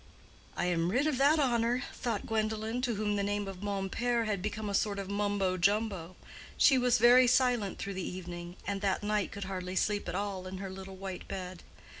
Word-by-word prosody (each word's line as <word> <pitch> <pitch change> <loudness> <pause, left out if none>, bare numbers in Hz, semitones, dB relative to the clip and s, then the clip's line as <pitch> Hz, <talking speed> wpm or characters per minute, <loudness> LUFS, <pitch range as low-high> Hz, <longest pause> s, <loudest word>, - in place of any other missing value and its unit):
"I - - 0
am 170 -1 +1
rid 250 +9 +2
of 300 -4 0
that 290 +3 +5
horror," 245 -3 +2
thought 230 -4 -3
Gwendolen, 220 +2 -1
to 245 -3 0
whom 210 0 0
the - - +1
name 205 0 -1
of 195 -1 -7
Mompert 205 +4 -1
had 205 -4 -1
become 215 +2 -3
a 200 - -3
sort 200 0 +1
of 195 0 -4
Mumbo 200 -2 0
jumbo. 195 -2 0 0.4
She 275 - +6
was 245 0 +3
very 245 +2 +7
silent 245 -5 +2
through 200 - -4
the 190 - -4 0.2
evening, 175 -1 -7
and 200 -1 -2
that 195 0 0
night 210 -1 0
could 200 0 -5
hardly 185 -1 -4
sleep 205 +1 0
at - - -3
all 195 -2 -3
in 185 0 -6
her 190 0 -5
little 190 0 -8
white 190 -1 -7
bed. 185 -2 -6
205 Hz, 205 wpm, -31 LUFS, 190-225 Hz, 0.4 s, very